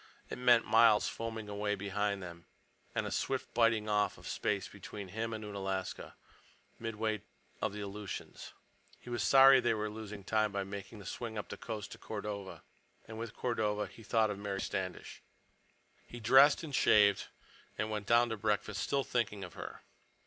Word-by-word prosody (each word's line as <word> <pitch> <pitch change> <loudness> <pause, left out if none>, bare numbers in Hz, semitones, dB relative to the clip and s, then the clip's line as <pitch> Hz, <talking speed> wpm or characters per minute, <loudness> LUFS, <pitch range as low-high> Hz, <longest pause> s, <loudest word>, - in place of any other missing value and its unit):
It - - -5
meant 120 -2 +5
miles 115 -1 +5
foaming 110 -2 -5
away 105 0 -1
behind 100 0 -2
them 85 -1 -10 0.5
and - - 0
a - - -4
swift 135 -1 -2
biting 115 -2 +3
off 105 -1 +1
of - - -11
space - - -1
between 100 -3 -9
him 110 +4 -3
and 110 -1 -5
Unalaska, 95 -2 -4 0.6
midway 110 -1 -2 0.4
of - - 0
the 105 +1 -6
Aleutians. 100 0 -7 0.5
He 120 - -10
was 120 - -1
sorry 135 0 +8
they 120 -2 +2
were 105 0 -2
losing 105 -2 -8
time 110 +1 +1
by 100 -1 -2
making 100 +2 -7
the 100 - -11
swing 110 +3 -5
up 105 - -5
the - - -5
coast 110 -3 -6
to - - -9
Cordova. 105 -2 -6 0.4
And 110 0 -8
with 115 -1 -6
Cordova 105 -4 0
he 115 - -13
thought 110 -1 +2
of 100 - -5
Mary 100 -1 -3
Standish. 95 -3 -4 0.9
He 120 - -9
dressed 135 +7 +6
and 150 -3 -7
shaved 100 -5 +5 0.5
and 110 0 -2
went 105 -2 -3
down 120 +1 +5
to 110 - -3
breakfast, 105 0 -1
still 140 -1 +1
thinking 105 -6 -1
of 90 - -8
her. - - -8
105 Hz, 175 wpm, -33 LUFS, 100-115 Hz, 0.9 s, sorry